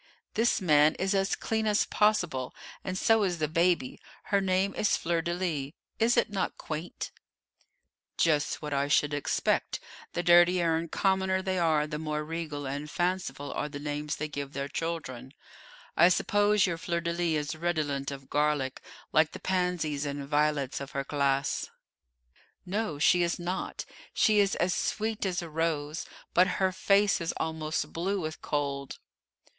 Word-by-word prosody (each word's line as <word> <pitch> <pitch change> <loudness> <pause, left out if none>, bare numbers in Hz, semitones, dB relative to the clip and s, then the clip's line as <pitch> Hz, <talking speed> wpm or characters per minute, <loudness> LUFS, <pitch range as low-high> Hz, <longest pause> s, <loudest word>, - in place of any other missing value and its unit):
"This 230 +2 +2
man 150 -4 +4
is 190 +2 0
as 195 0 +1
clean 220 -1 -1
as 210 -1 +3
possible, 175 -12 +1 0.3
and 185 -1 -3
so 225 +2 +4
is 180 -4 0
the 155 -1 0
baby. 165 -3 +1 0.2
Her 200 -1 +1
name 190 +1 +1
is 210 - +2
Fleur 170 0 0
de 170 0 -2
lis; 155 -6 -2 0.3
is 235 +2 +3
it 235 -2 +2
not 195 - -2
quaint?" 160 +3 -5 1.1
"Just 155 -2 +1
what 150 -1 -3
I 140 0 +1
should 145 +1 +2
expect; 145 -1 0 0.3
the 175 - -1
dirtier 175 -1 +5
and 165 0 -3
commoner 190 -1 +1
they 185 -1 0
are, 160 -3 +3
the 150 0 -5
more 150 -1 -2
regal 155 -2 -4
and 145 +3 -4
fanciful 175 -3 -2
are 150 - -2
the 145 - -6
names 150 +1 -3
they 155 - -3
give 145 -1 -6
their 140 0 -3
children. 145 -5 -5 0.6
I 175 - +7
suppose 205 +2 +3
your 170 -3 -2
Fleur 170 0 -1
de 170 0 -1
lis 160 -4 0
is - - -9
redolent 155 -5 -1
of 135 -1 -8
garlic, 145 -3 0 0.3
like 155 0 +4
the - - -7
Pansies 180 -6 0
and 140 -1 -4
Violets 145 -2 +1
of 140 - -6
her 140 - -1
class." 140 -1 0 1.0
"No, 195 -4 -2
she 175 +4 +4
is 170 0 +1
not. 180 +2 -4 0.3
She 215 -2 +4
is 200 -1 +3
as 175 +1 +1
sweet 220 +1 -1
as 180 -2 -2
a 170 - -7
rose; 155 -1 -1 0.3
but 180 +1 +5
her 190 -1 +2
face 200 +1 +3
is 165 - -2
almost 160 -1 -2
blue 190 +4 -1
with 155 -2 -5
cold." 140 -2 -2
165 Hz, 165 wpm, -29 LUFS, 145-185 Hz, 1.1 s, I